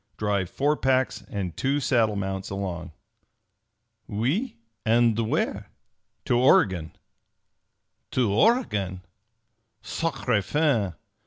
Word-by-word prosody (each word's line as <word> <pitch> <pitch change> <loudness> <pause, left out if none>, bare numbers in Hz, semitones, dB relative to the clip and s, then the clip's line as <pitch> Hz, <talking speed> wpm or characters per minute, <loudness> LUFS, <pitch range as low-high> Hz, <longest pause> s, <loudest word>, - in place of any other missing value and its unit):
Drive 100 -3 0
four 145 +7 +1
packs 130 -2 +1
and 95 -4 -4
two 140 +2 0
saddle 115 -6 +2
mounts 95 -1 -3
along." 90 -4 -4 1.2
"Oui? 140 - -1 0.3
And 115 0 +3
where?" - - -1 0.6
"To 120 - +2
Oregon!" 95 -10 +3 1.1
"To 120 -6 +1
Oregon? 105 - +2 0.8
_Sacre 105 - -1
'Fan!' 115 - +1
110 Hz, 90 wpm, -26 LUFS, 95-130 Hz, 1.2 s, And